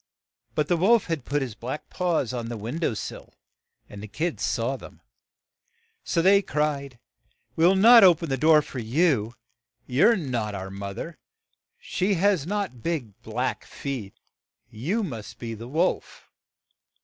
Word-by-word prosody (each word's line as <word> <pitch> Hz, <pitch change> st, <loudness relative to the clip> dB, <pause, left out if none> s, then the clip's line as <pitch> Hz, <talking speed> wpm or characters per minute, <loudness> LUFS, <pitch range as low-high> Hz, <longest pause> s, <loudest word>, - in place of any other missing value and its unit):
But 150 Hz, -1 st, +1 dB
the 175 Hz, -, +2 dB
wolf 215 Hz, +6 st, +4 dB
had 165 Hz, -7 st, -3 dB
put 145 Hz, 0 st, 0 dB
his 125 Hz, -4 st, -5 dB
black 125 Hz, +7 st, -6 dB
paws 170 Hz, -9 st, 0 dB
on 120 Hz, -2 st, -4 dB
the 120 Hz, 0 st, -5 dB
win 115 Hz, +10 st, -5 dB
dow 155 Hz, -9 st, 0 dB
sill, 100 Hz, -, -8 dB, 0.5 s
and 100 Hz, -, -10 dB
the 105 Hz, -, -7 dB
kids 155 Hz, -, -3 dB
saw 120 Hz, +3 st, 0 dB
them. -, -, -12 dB, 1.0 s
So 165 Hz, -, 0 dB
they 200 Hz, +2 st, +6 dB
cried, 145 Hz, -6 st, -2 dB, 0.6 s
'We 165 Hz, -, +3 dB
will 190 Hz, -, +5 dB
not 230 Hz, +4 st, +8 dB
o 180 Hz, -3 st, +8 dB
pen 165 Hz, 0 st, -6 dB
the 135 Hz, -, +1 dB
door 155 Hz, +2 st, +5 dB
for 130 Hz, -, -7 dB
you. 120 Hz, -2 st, +1 dB, 0.5 s
You 135 Hz, +10 st, +4 dB
are 230 Hz, -1 st, +4 dB
not 120 Hz, -, -3 dB
our 95 Hz, 0 st, -6 dB
moth 100 Hz, 0 st, -6 dB
er; 165 Hz, -1 st, -6 dB, 0.6 s
she 195 Hz, +2 st, -1 dB
has 185 Hz, -4 st, +2 dB
not 200 Hz, -, -3 dB
big, 145 Hz, -10 st, -3 dB
black -, -, -3 dB
feet. 125 Hz, -8 st, -6 dB, 0.6 s
You 160 Hz, -, -2 dB
must 115 Hz, -, -7 dB
be 115 Hz, -1 st, -6 dB
the 115 Hz, +2 st, -8 dB
wolf." 165 Hz, +8 st, -2 dB
145 Hz, 165 wpm, -25 LUFS, 115-175 Hz, 1.0 s, not